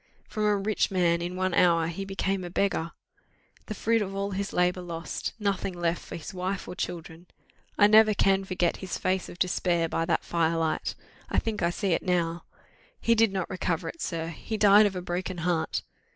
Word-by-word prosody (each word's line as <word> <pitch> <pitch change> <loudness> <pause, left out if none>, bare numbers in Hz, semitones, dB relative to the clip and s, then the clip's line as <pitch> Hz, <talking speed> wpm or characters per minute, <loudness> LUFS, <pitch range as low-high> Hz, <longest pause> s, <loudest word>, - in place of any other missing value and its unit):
From 215 -1 -2
a 210 -1 +3
rich 205 +2 0
man 170 -3 +2
in 175 +1 -4
one 185 0 0
hour 170 -2 +4
he 170 +4 -4
became 195 -1 -2
a 175 - -5
beggar! 175 -3 0 0.8
The 215 - -4
fruit 225 +3 +1
of 195 -1 -3
all 200 +1 -2
his 200 +1 -3
labour 180 +1 +1
lost 170 -1 -5
nothing 200 -3 -1
left 175 0 -1
for - - -8
his 170 +4 -7
wife 185 +1 -3
or - - -5
children! 175 -1 -6 0.5
I 205 - +7
never 215 0 +6
can 195 -1 +3
forget 180 -2 0
his 190 -2 -5
face 185 0 -1
of - - -10
despair 175 -2 +1
by 165 0 -1
that 165 -1 0
fire 165 -1 +1
light. 160 -1 -1 0.3
I - - -1
think 220 -2 -1
I 170 - +3
see 195 +3 -2
it 165 - +2
now! 175 -2 -1 0.5
He 230 - +3
did 225 -2 +4
not 190 -3 -2
recover 180 -3 -2
it, 335 - -9
sir, 165 -1 -3
he 215 +7 -5
died 210 0 +7
of 195 - -5
a 180 - -4
broken 180 +1 -3
heart. 170 -1 -1
185 Hz, 205 wpm, -27 LUFS, 170-200 Hz, 0.8 s, I